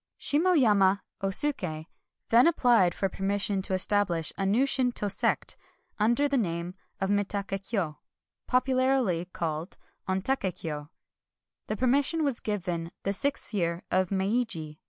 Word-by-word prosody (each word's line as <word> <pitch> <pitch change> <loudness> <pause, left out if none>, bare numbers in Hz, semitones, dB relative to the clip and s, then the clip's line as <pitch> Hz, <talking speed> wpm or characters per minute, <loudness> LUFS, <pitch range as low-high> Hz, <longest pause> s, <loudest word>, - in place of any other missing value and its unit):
Shimo 340 +6 +3
yama 205 - +3 0.2
Osuk^ 190 - +2 0.4
then 235 +6 +6
applied 240 - +3
for 195 - 0
permission 195 +1 -1
to 190 0 -1
establish 185 -4 +1
a 195 - -1
new 230 +7 +3
Shinto 250 -6 0
sect, - - 0 0.4
under 235 +7 +3
the 280 -1 0
name 170 -3 -3 0.3
of 195 +1 -1
Mitak^ 200 0 -1 0.2
Kyo, 175 -10 -2 0.2
— - - -61
popularly 255 -8 +2
called 165 -1 -5 0.3
Ontak^ 190 0 -1
Kyo; 160 -4 -4
and 145 - -13 0.8
the 215 - -3
permission 280 +6 +2
was 275 -5 0
given 180 -5 -3
in - - -14
the 200 - 0
sixth 275 +3 -1
year 170 -3 -1
of 185 -1 +2
Meiji. 190 -6 -2
200 Hz, 140 wpm, -28 LUFS, 180-250 Hz, 0.8 s, then